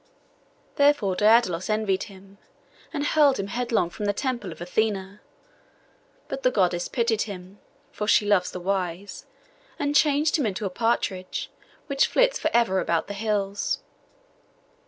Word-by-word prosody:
Therefore 285 -10 +3
Daidalos 210 -4 +3
envied 215 -3 0
him, 195 +1 -16 0.5
and 290 -2 -2
hurled 295 -3 +4
him 195 - -1
headlong 235 -7 0
from 210 - -5
the 205 - +1
temple 240 -5 -3
of 160 - -10
Athené; 195 +2 -2 1.1
but 270 - -5
the 255 - +3
Goddess 180 -6 +1
pitied 230 -3 0
him 185 0 -9 0.3
(for 210 - -4
she 210 - +4
loves 205 -3 +2
the 180 - -6
wise), 185 0 -3 0.5
and 290 0 -1
changed 300 +1 +3
him 265 - +1
into 200 +1 -3
a 190 - -2
partridge, 190 -3 -2 0.3
which 275 -2 +2
flits - - +2
for - - 0
ever 230 -5 +2
about 170 -2 0
the 205 - -6
hills. 205 -1 -1
205 Hz, 145 wpm, -25 LUFS, 190-245 Hz, 1.1 s, hurled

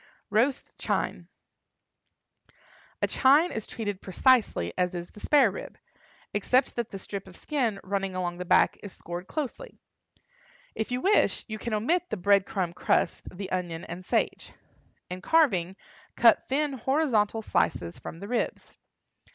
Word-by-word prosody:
ROAST 245 +6 +1
CHINE. - - -2 1.8
A - - +4
chine 290 +6 +4
is 220 - -5
treated 205 -4 -4
precisely 200 - +2
as 180 0 0
is 175 0 -6
the - - -13
spare 270 -4 +4
rib, - - -8 0.6
except 250 +6 +2
that 235 -2 -2
the 195 - -6
strip 195 0 -7
of 185 - -13
skin 245 -9 -1
running 195 -1 -2
along 175 -1 -3
the - - -2
back 180 - +3
is 205 - -8
scored 175 +2 -7
closely. 310 - -5 1.0
If 220 - -3
you 250 0 -1
wish, 405 +3 +2
you 215 -1 -5
can 225 -1 -2
omit 340 +12 0
the - - -2
bread 200 +1 +3
crumb 180 -3 -2
crust, 180 - 0
the 195 -1 -6
onion 175 -3 -3
and 175 +2 -7
sage. - - -1 0.6
In 185 0 -5
carving, 190 - +3 0.4
cut 230 -2 +5
thin 285 +2 0
horizontal 245 -5 +1
slices 85 - -1
from 165 - -8
the 200 - -7
ribs. 245 +2 -3
210 Hz, 150 wpm, -27 LUFS, 185-260 Hz, 1.8 s, cut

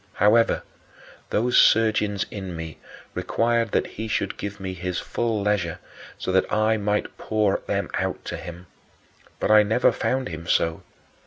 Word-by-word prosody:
However, 110 +3 +3 0.7
those 120 +3 +3
surgings 110 -2 +3
in 95 -4 -6
me 80 -2 -7 0.3
required 115 0 +1
that - - +2
he 110 +1 -6
should 100 -2 -1
give 100 0 -6
me 95 -1 -4
his 90 0 -4
full 115 -3 -1
leisure 100 -5 0 0.4
so - - -3
that 95 0 +2
I 110 +1 +3
might 105 0 -2
pour 105 -3 +1
them - - -1
out - - -2
to - - -4
him; 85 +1 -9 0.7
but - - +1
I 110 0 +8
never 110 +4 +3
found 130 -4 -1
him 85 0 -7
so. 80 -1 +1
105 Hz, 155 wpm, -24 LUFS, 95-110 Hz, 0.7 s, I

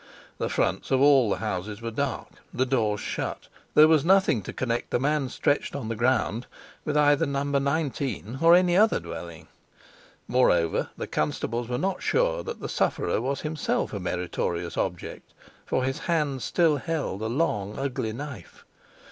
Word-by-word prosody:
The - - -1
fronts - - -1
of 130 - +3
all 135 -4 +5
the - - +1
houses 105 -1 -4
were 115 0 -5
dark, 135 +2 -3 0.2
the 130 - 0
doors 110 -5 0
shut; - - -4 0.3
there 155 +1 +8
was 155 -3 +4
nothing 190 - +4
to - - -7
connect 120 -2 -2
the - - +1
man 145 0 0
stretched 145 +3 0
on 130 -6 -4
the 115 - -2
ground 120 0 0 0.4
with 150 -1 0
either 145 +1 +4
No. 140 0 -1
19 140 -4 -1
or 165 +1 +7
any 180 -1 +4
other 215 +3 +4
dwelling. 85 -2 -8 0.8
Moreover, 90 -10 +2
the - - -3
constables 115 +10 -2
were 125 - -1
not 190 +4 -1
sure - - +1
that 470 - -7
the - - -3
sufferer - - 0
was 140 +2 -2
himself 155 -6 -2
a 100 - -3
meritorious 90 -1 -3
object, - - -4 0.3
for 130 - 0
his 135 +1 -2
hand 150 -6 -1
still 160 +4 +2
held 145 - -3
a 110 - -1
long, 110 -6 -1
ugly 130 -5 -2
knife. 130 - -9
135 Hz, 165 wpm, -26 LUFS, 110-150 Hz, 0.8 s, there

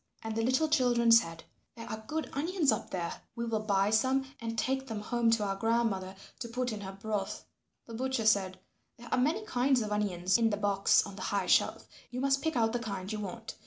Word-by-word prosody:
And 220 -1 -4
the 225 - 0
little 260 +7 +2
children 245 -6 +3
said, 165 -8 +4 0.3
"There 230 -1 -9
are 220 0 -6
good 315 +1 -2
onions 320 +1 +1
up - - -2
there; 170 -2 -4
we 235 - -3
will 225 -2 -1
buy 200 -1 +1
some 260 +4 +2 0.2
and 230 0 -4
take 265 +3 -1
them 220 -3 -4
home 235 +2 +1
to 225 -2 +2
our 195 -1 -1
grandmother 200 -3 0 0.2
to 235 - -4
put 250 +1 -2
in 210 - -6
her 190 -1 -6
broth." 205 -2 -3 0.4
The 230 - -10
butcher 260 -1 -1
said, 195 -4 +3 0.4
"There 235 - -12
are - - +2
many 310 +12 +1
kinds 255 - +2
of 210 - -5
onions 190 -1 +1
in 225 -1 +3
the 205 - -1
box 200 -1 +3
on 200 -1 -9
the - - -7
high 200 -2 -1
shelf. - - +2 0.2
You 250 - -5
must 275 +1 +2
pick 320 -2 -1
out 225 -1 +2
the 240 - 0
kind 200 -4 -5
you 215 - -3
want. 225 +3 -7
225 Hz, 225 wpm, -31 LUFS, 205-250 Hz, 0.4 s, said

